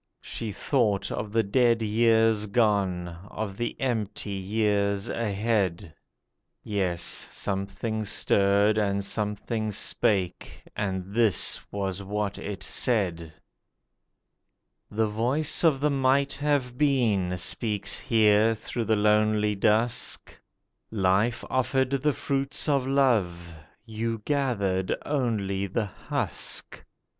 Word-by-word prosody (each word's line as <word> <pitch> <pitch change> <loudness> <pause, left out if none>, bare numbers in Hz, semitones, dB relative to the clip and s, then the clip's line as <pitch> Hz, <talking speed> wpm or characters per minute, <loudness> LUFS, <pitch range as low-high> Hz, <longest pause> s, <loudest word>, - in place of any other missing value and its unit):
She 110 -2 -5
thought 105 -3 0
of 105 -1 -4
the 115 +1 +2
dead 115 +2 +2
years 110 0 +3
gone, 100 -5 +1 0.2
of 105 -2 -5
the 120 +1 -4
empty 110 -5 -2
years 100 0 0
ahead— 100 -6 -1 0.7
(Yes, 95 -5 -1
something 100 +3 -2
stirred 100 +2 +3
and 100 -1 0
something 105 +1 -2
spake, 95 -2 -1
and 95 -1 -3
this 110 -4 +2
was 95 -1 -3
what 100 0 -3
it 100 -1 -6
said:) 90 -9 0 1.6
'The 110 +1 0
voice 125 +11 0
of 155 -5 +4
the 150 +1 +1
Might 135 0 +2
Have 140 -4 -1
Been 110 -11 +2
speaks 105 +3 0
here 110 -2 +3
through 115 +2 -4
the 110 +1 +2
lonely 105 0 +2
dusk; 110 +3 +1 0.5
Life 105 +3 +1
offered 130 +1 0
the 140 +2 +1
fruits 140 +1 -2
of 140 -3 +1
love; 100 -11 +1 0.3
you 115 0 -3
gathered 100 -10 0
only 105 -9 -1
the 105 +3 -1
husk. 95 - -3
105 Hz, 105 wpm, -26 LUFS, 100-120 Hz, 1.6 s, of